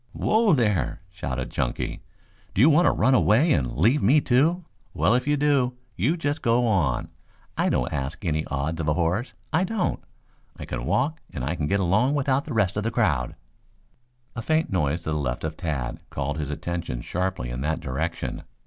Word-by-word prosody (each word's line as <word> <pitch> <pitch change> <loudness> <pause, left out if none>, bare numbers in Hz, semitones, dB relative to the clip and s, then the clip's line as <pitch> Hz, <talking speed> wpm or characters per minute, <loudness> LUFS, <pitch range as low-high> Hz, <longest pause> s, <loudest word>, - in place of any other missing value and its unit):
"Whoa 220 -3 +3
there!" 105 - +1
shouted 65 -9 -4
Chunky. - - -2 0.5
"Do 100 - +3
you 150 +6 +7
want 170 +4 +5
to - - +5
run 130 - +3
away 130 +6 +4
and 65 -5 -1
leave 130 +8 +3
me, 135 +10 +5
too? 155 +7 +2 0.3
Well, 105 - +3
if 125 +3 +1
you 145 0 +2
do, 140 -4 +2 0.2
you 130 - +1
just 145 -2 -2
go 120 0 +3
on. 85 - +1 0.5
I - - +1
don't - - 0
ask 70 +8 -4
any 80 -2 0
odds 75 +4 -2
of 80 - -3
a 75 - +2
horse, 90 +8 -1 0.2
I 170 +3 +3
don't. 190 -1 -1 0.5
I - - -7
can - - -4
walk 155 +3 +1
and 65 - -5
I 70 +5 -1
can 75 -4 -2
get 100 +5 +1
along 105 +10 +2
without 140 +1 +1
the 150 - -5
rest 100 -3 +1
of 105 - -1
that 115 - -1
crowd." 75 - +1 1.0
A 115 - -3
faint 160 +6 +1
noise 80 -2 0
to 80 - -3
the 75 - 0
left 60 -3 -2
of 80 0 -3
Tad 70 -9 -3
called 70 +2 -3
his 75 -2 -3
attention 75 -4 -4
sharply 90 -9 -2
in 60 +1 -4
that 80 +3 -1
direction. 65 0 -3
95 Hz, 195 wpm, -25 LUFS, -, 1.0 s, you